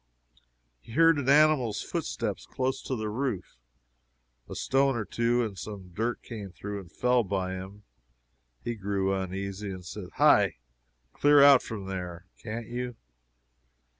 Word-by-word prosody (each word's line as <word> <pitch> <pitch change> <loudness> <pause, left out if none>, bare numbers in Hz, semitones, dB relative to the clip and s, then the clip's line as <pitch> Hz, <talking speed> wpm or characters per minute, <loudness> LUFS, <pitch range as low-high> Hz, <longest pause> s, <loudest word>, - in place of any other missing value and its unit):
He 110 - -13
heard 165 +1 +5
an 135 -1 -1
animal's 145 -7 +4
footsteps - - -3
close 130 +1 -2
to 130 - -3
the 110 -2 -3
roof; 105 - -3 0.9
a - - -6
stone 135 0 +2
or 110 -2 -2
two 120 +4 +1
and 105 -3 -6
some 95 -4 -8
dirt 115 +6 -2
came 105 -5 -7
through 100 +2 -6
and 90 -4 -12
fell 125 +4 +2
by 95 -2 -2
him. 95 +2 -8 0.8
He 120 - -2
grew 100 -2 -1
uneasy 95 +1 -4
and 95 -2 -7
said - - -7
"Hi! - - +5 0.6
clear 145 -1 +6
out 140 -2 +8
from 105 -4 -6
there, 90 -2 -5 0.2
can't 115 +1 -5
you!" 125 0 -4
110 Hz, 145 wpm, -28 LUFS, 95-125 Hz, 0.9 s, out